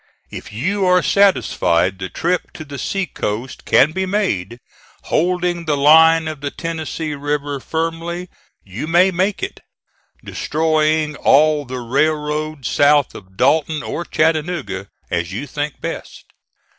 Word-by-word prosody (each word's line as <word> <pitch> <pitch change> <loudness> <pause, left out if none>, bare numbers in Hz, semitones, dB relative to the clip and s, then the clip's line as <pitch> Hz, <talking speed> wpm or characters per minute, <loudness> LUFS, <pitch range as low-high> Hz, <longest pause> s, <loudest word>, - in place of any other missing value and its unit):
If - - -8
you 185 - -1
are 180 -1 +4
satisfied 95 - +2
the 95 0 -5
trip 175 - -2
to 155 - -9
the 140 -1 -8
sea 195 -1 -1
coast 115 -3 -5
can 150 - +4
be 190 +3 -2
made, 120 - -1 0.5
holding 175 0 0
the 150 -2 +1
line 160 +3 +6
of 155 -3 -6
the 145 - -2
Tennessee 160 -1 -4
River 145 0 -3
firmly, 165 +4 -3 0.4
you 105 +10 -6
may 175 +3 +4
make 185 +3 -1
it, - - -4 0.6
destroying 155 -1 0
all 150 +1 +4
the 125 0 -6
railroad 150 +2 -1
south 145 -1 +3
of 95 -1 -13
Dalton 150 +2 +2
or 170 - -4
Chattanooga, 155 - -1 0.2
as 85 +1 -1
you 120 +8 -4
think 145 +1 -4
best. - - -6
155 Hz, 135 wpm, -19 LUFS, 140-165 Hz, 0.6 s, line